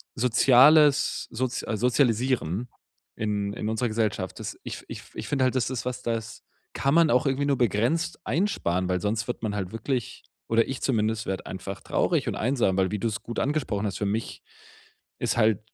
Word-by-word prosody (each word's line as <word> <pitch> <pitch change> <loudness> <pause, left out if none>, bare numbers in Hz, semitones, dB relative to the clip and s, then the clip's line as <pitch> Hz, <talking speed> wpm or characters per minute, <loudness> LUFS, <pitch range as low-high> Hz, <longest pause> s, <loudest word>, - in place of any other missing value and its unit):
soziales 135 +5 +5
soz 125 +2 -2
äh, 110 - -2
sozialisieren 120 - +1 0.5
in 105 -2 -2
in 105 - -3
unserer 110 +2 0
Gesellschaft, 110 -2 -2
das - - -6
ich - - -7
ich - - -7
ich - - -6
finde 135 -2 +1
halt, 130 - +1
das 130 - +1
ist 130 -2 -4
was, 125 -1 -3
das 115 -2 -4 0.3
kann 135 0 +1
man 165 -2 +5
auch 125 +3 +3
irgendwie 135 +1 0
nur 140 - +2
begrenzt 120 - 0
einsparen, 110 - 0
weil 90 0 +1
sonst 110 +2 -1
wird 120 - -4
man 105 -2 -1
halt 95 -3 -3
wirklich 125 0 -3 0.3
oder 115 0 +3
ich 135 - -5
zumindest 110 -2 0
werde 95 0 -3
einfach 95 +1 -6
traurig - - 0
und - - -2
einsam, 115 -6 +1
weil 95 -1 +2
wie 105 - -1
du's 110 0 -2
gut 120 - -7
angesprochen 130 -8 -1
hast, 95 - -4
für 105 - -1
mich 110 +3 -3 0.8
ist - - -1
halt 110 -3 +3
115 Hz, 185 wpm, -26 LUFS, 105-130 Hz, 0.8 s, soziales